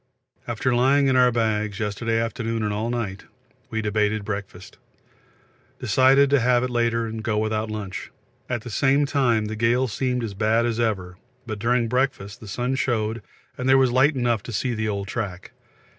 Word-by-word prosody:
After 120 Hz, +2 st, 0 dB
lying 135 Hz, +4 st, +3 dB
in 135 Hz, -1 st, +3 dB
our 125 Hz, -1 st, +5 dB
bags 110 Hz, -3 st, -1 dB
yesterday 115 Hz, +2 st, -1 dB
afternoon 115 Hz, 0 st, -2 dB
and 105 Hz, -1 st, -1 dB
all 110 Hz, +3 st, -2 dB
night, 110 Hz, -6 st, -4 dB, 0.4 s
we 110 Hz, -1 st, -2 dB
debated 105 Hz, 0 st, 0 dB
breakfast; 100 Hz, -2 st, -7 dB, 1.0 s
decided 135 Hz, +2 st, +4 dB
to 140 Hz, -, +5 dB
have 125 Hz, 0 st, +3 dB
it 125 Hz, -, -2 dB
later 115 Hz, -1 st, +1 dB
and 110 Hz, 0 st, -5 dB
go 110 Hz, -2 st, 0 dB
without 110 Hz, 0 st, -1 dB
lunch. 105 Hz, -4 st, -5 dB, 0.4 s
At 120 Hz, -2 st, -2 dB
the 120 Hz, -, -8 dB, 0.3 s
time 120 Hz, -6 st, +1 dB
the 110 Hz, +1 st, -4 dB
gale 120 Hz, +4 st, +2 dB
seemed 125 Hz, +1 st, -1 dB
as 110 Hz, -3 st, -4 dB
bad 110 Hz, +4 st, +2 dB
as 120 Hz, -1 st, -1 dB
ever, 95 Hz, -6 st, -1 dB, 0.3 s
but 110 Hz, -3 st, -5 dB
during 120 Hz, +2 st, +1 dB
breakfast 125 Hz, -5 st, -1 dB
the 110 Hz, -, -11 dB
sun 125 Hz, +5 st, -2 dB
showed 115 Hz, -4 st, -1 dB, 0.4 s
and 130 Hz, +1 st, -1 dB
there 135 Hz, -, +7 dB
was 130 Hz, -2 st, +3 dB
light 135 Hz, +4 st, +4 dB
enough 120 Hz, -4 st, +1 dB
to 120 Hz, -, -8 dB
see 120 Hz, +3 st, -1 dB
the 110 Hz, -1 st, -2 dB
old 100 Hz, -1 st, -3 dB
track. 100 Hz, -4 st, -5 dB
115 Hz, 180 wpm, -24 LUFS, 105-125 Hz, 1.0 s, there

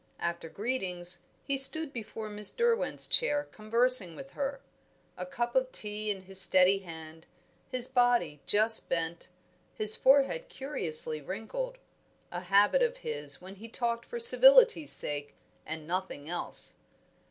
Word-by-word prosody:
After 170 Hz, -1 st, -6 dB
greetings, 190 Hz, -6 st, -3 dB, 0.2 s
he 275 Hz, -1 st, -2 dB
stood 315 Hz, +2 st, +5 dB
before 220 Hz, -1 st, -9 dB
Miss 210 Hz, -1 st, 0 dB
Derwent's 470 Hz, 0 st, +1 dB
chair 295 Hz, -12 st, 0 dB
conversing 220 Hz, -4 st, +4 dB
with 275 Hz, 0 st, -12 dB
her; 275 Hz, 0 st, -5 dB, 0.6 s
a -, -, -8 dB
cup 240 Hz, -3 st, -5 dB
of 260 Hz, 0 st, -1 dB
tea 210 Hz, 0 st, -5 dB
in 195 Hz, -2 st, -4 dB
his 190 Hz, 0 st, +2 dB
steady 185 Hz, +1 st, +5 dB
hand, 160 Hz, -3 st, -13 dB, 0.4 s
his 255 Hz, -1 st, -2 dB
body 240 Hz, -, -1 dB
just 220 Hz, +2 st, +1 dB
bent, 165 Hz, 0 st, -5 dB, 0.5 s
his 215 Hz, 0 st, +5 dB
forehead 280 Hz, -, +1 dB
curiously 160 Hz, -, -2 dB
wrinkled 225 Hz, -, -7 dB, 0.5 s
a 175 Hz, -, -6 dB
habit 200 Hz, -, +1 dB
of -, -, -1 dB
his 460 Hz, -, -4 dB
when 190 Hz, +2 st, -13 dB
he 220 Hz, +4 st, -12 dB
talked 235 Hz, 0 st, -5 dB
for 475 Hz, -, -7 dB
civility's 470 Hz, -7 st, +6 dB
sake 145 Hz, -1 st, +2 dB, 0.3 s
and 160 Hz, 0 st, -6 dB
nothing 180 Hz, -4 st, -6 dB
else. 175 Hz, +1 st, -1 dB
215 Hz, 140 wpm, -28 LUFS, 180-275 Hz, 0.6 s, civility's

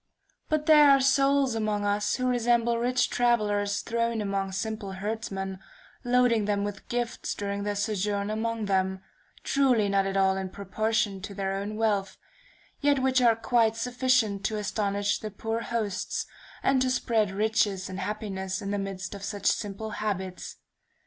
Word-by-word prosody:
But 310 Hz, -1 st, 0 dB
there 300 Hz, -2 st, +7 dB
are 275 Hz, 0 st, +7 dB
souls 275 Hz, -1 st, +3 dB
among 215 Hz, -2 st, -1 dB
us 205 Hz, 0 st, +1 dB
who 255 Hz, -, -2 dB
resemble 235 Hz, -1 st, +2 dB
rich 250 Hz, +1 st, +2 dB
travelers 205 Hz, -4 st, +1 dB
thrown 230 Hz, 0 st, -1 dB
among 195 Hz, -2 st, -2 dB
simple 205 Hz, 0 st, -4 dB
herdsmen, 195 Hz, -1 st, -4 dB, 0.4 s
loading 245 Hz, -3 st, +3 dB
them 200 Hz, -1 st, 0 dB
with 205 Hz, -1 st, -6 dB
gifts 240 Hz, 0 st, -2 dB
during 200 Hz, 0 st, -3 dB
their 205 Hz, 0 st, -2 dB
sojourn 205 Hz, 0 st, -1 dB
among 225 Hz, 0 st, -2 dB
them, 190 Hz, -1 st, 0 dB, 0.4 s
truly 250 Hz, -7 st, +2 dB
not 195 Hz, 0 st, +2 dB
at 195 Hz, 0 st, -1 dB
all 190 Hz, 0 st, +3 dB
in 190 Hz, -1 st, -3 dB
proportion 200 Hz, +1 st, -1 dB
to 200 Hz, +1 st, -7 dB
their 195 Hz, -1 st, -2 dB
own 200 Hz, +2 st, -4 dB
wealth, 210 Hz, -3 st, 0 dB, 0.6 s
yet 285 Hz, -1 st, +3 dB
which 260 Hz, -1 st, +2 dB
are 235 Hz, -2 st, +5 dB
quite 225 Hz, -1 st, +2 dB
sufficient 245 Hz, -4 st, +1 dB
to 215 Hz, -, 0 dB
astonish 205 Hz, -1 st, -1 dB
the 215 Hz, -, -5 dB
poor 225 Hz, +3 st, -3 dB
hosts, 225 Hz, -5 st, -2 dB, 0.4 s
and 270 Hz, -1 st, +3 dB
to 260 Hz, -, +2 dB
spread 225 Hz, -5 st, +1 dB
riches 205 Hz, -1 st, 0 dB
and 190 Hz, 0 st, -6 dB
happiness 190 Hz, -2 st, -3 dB
in 200 Hz, -2 st, -4 dB
the 205 Hz, -, -1 dB
midst 195 Hz, -1 st, -5 dB
of 200 Hz, -1 st, -8 dB
such 200 Hz, -1 st, -5 dB
simple 210 Hz, +1 st, -1 dB
habits. 190 Hz, -4 st, -4 dB
210 Hz, 160 wpm, -27 LUFS, 200-235 Hz, 0.6 s, there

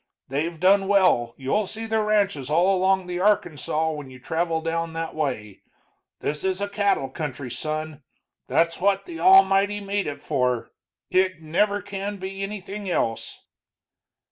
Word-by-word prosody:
They've 155 Hz, +5 st, -2 dB
done 195 Hz, +2 st, +4 dB
well 180 Hz, -13 st, +3 dB
you'll 185 Hz, +10 st, 0 dB
see 225 Hz, +3 st, -5 dB
their 220 Hz, 0 st, +1 dB
ranches 200 Hz, -10 st, +1 dB
all 175 Hz, +5 st, +3 dB
along 190 Hz, 0 st, +2 dB
the 175 Hz, 0 st, -4 dB
Arkansaw 160 Hz, -5 st, +1 dB
when 145 Hz, -3 st, -8 dB
you 130 Hz, -, -12 dB
travel 165 Hz, +5 st, -1 dB
down 165 Hz, 0 st, -2 dB
that 165 Hz, 0 st, -4 dB
way. 125 Hz, -10 st, -3 dB, 0.6 s
This 150 Hz, +1 st, -3 dB
is 190 Hz, 0 st, 0 dB
a 200 Hz, -, -1 dB
cattle 200 Hz, -9 st, +1 dB
country, 135 Hz, -2 st, -5 dB
son; 155 Hz, +3 st, -4 dB, 0.5 s
that's 165 Hz, 0 st, +1 dB
what 195 Hz, 0 st, +2 dB
the 335 Hz, -2 st, -8 dB
Almighty 205 Hz, -, +5 dB
made 200 Hz, 0 st, -2 dB
it 145 Hz, -, -5 dB
for. 125 Hz, -2 st, -1 dB, 0.4 s
It 185 Hz, -3 st, +1 dB
never 200 Hz, +6 st, +1 dB
can 200 Hz, 0 st, -5 dB
be 195 Hz, +1 st, -6 dB
anything 200 Hz, 0 st, -5 dB
else." 115 Hz, -9 st, -2 dB
180 Hz, 150 wpm, -24 LUFS, 155-200 Hz, 0.6 s, Almighty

